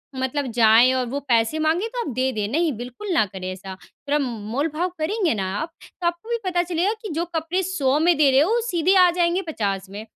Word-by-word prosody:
मतलब 260 +2 -2
जाएँ 230 +3 +6
और 255 -1 0
वो 280 +3 -2
पैसे 230 +5 +2
माँगे, 320 +7 +1
तो - - -6
आप 275 - -4
दे 260 +1 +1
दें। 210 -1 -2
नहीं, 325 +3 +1
बिल्कुल 250 - -6
ना 310 - +3
करें 185 -1 -6
ऐसा। 190 +1 -8
थोड़ा 290 +1 -3
मोल 235 +4 -3
भाव 355 +3 0
करेंगे 365 - 0
ना 190 -3 -2
आप, 330 - -5 0.3
तो 345 - +1
आपको 345 +6 -4
भी 470 - 0
पता 355 -1 +1
चलेगा 355 +4 0
कि 430 - -6
जो 330 +3 -1
कपड़े 330 +4 -1
100 295 -7 +1
में 340 +2 +4
दे 295 -2 +5
रहे 265 - +5
हो, 340 +8 +2
वो 475 +1 +2
सीधे 360 -2 +2
आ - - +5
जाएँगे 345 +1 +1
50 195 -6 -3
में। 205 +3 -8
300 Hz, 235 wpm, -23 LUFS, 235-350 Hz, 0.3 s, जाएँ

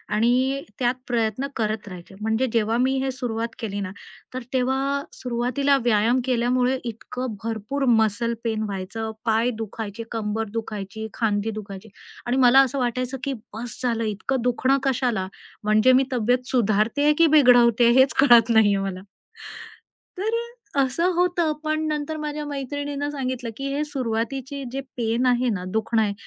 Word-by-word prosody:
आणि 255 +5 +2 0.2
त्यात 245 -1 +2
प्रयत्न 235 +2 0
करत 215 -2 -2
राहायचे 180 0 -10
म्हणजे 220 +4 +1
जेव्हा 225 0 +1
मी 260 +2 +2
हे 270 - -1
सुरुवात 230 -3 -3
केली 205 -3 -4
ना 200 -2 -4 0.4
तर 255 - -3
तेव्हा 260 +1 +1 0.2
अ, - - -7
सुरुवातीला 255 +3 0
व्यायाम 235 +2 +3
केल्यामुळे 250 +1 +1
इतकं 235 0 -5
भरपूर 230 +5 -2
मसल 230 0 +2
पेन 220 -2 -1
व्हायचं, 210 +2 -4
पाय 225 +2 +2
दुखायचे, 220 0 -5
कंबर 220 0 -2
दुखायची, 220 -1 -5
खांदी 215 -1 0
दुखायची 200 +1 -10 0.4
आणि 245 +2 0
मला 255 +1 +6
असं 270 0 +3
वाटायचं 255 +1 -1
की 275 -1 -1 0.2
बस 230 +2 -6
झालं 230 -2 0
इतकं 220 +5 -2
दुखणं 250 +3 +2
कशाला 245 -8 0 0.4
म्हणजे 215 +4 +4
मी 260 +1 +5
तब्येत 250 +1 +1
सुधारते 220 +2 +2
आहे 300 +1 +5
की 335 - +6
बिघडवते 240 -3 +6
हेच 265 +1 +5
कळत 240 -4 +6
नाहीये 205 -3 +5
मला. 195 -1 -4 1.2
तर 415 +4 -1 0.4
अ, - - +2
असं 305 +8 +1
होतं. 350 -2 +2
पण 310 0 0
नंतर 305 +1 -2
माझ्या 300 0 -4
मैत्रिणीनं 285 +1 -4
सांगितलं, 255 -4 -3
की 275 - -4
हे 295 - 0
सुरुवातीची 265 +1 -3
जे 270 - -3 0.2
पेन 235 +2 0
आहे 250 0 +2
ना 200 -4 -2
दुखणं 220 +1 +1
आहे, 205 -2 0
240 Hz, 155 wpm, -24 LUFS, 220-265 Hz, 1.2 s, मला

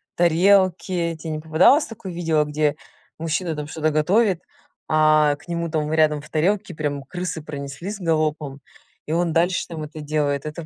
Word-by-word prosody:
тарелки. 175 0 +2
Те 160 - -6
не 155 -1 -3
попадалось 160 - +4
такое 205 -4 -8
видео, 165 -3 +1
где 150 0 0 0.4
мужчина, 165 +1 -2
там, 150 -1 -4
что-то 155 0 -1
готовит, 180 +5 +2 0.5
а 155 -1 +4
к 145 - -20
нему, 170 -1 -2
там, 155 -1 -1
рядом 155 -2 +3
в - - -15
тарелке 185 +3 0
прям 145 -2 -2
крысы 180 +1 -5
пронеслись 150 +7 -6
галопом, 155 -4 -1 0.5
и - - -4
он 170 -1 +1
дальше, 175 +2 +1
там, 160 -2 -6
это 155 0 -8
делает. 145 -1 -1
Это 155 +1 -7
160 Hz, 165 wpm, -22 LUFS, 150-175 Hz, 0.5 s, попадалось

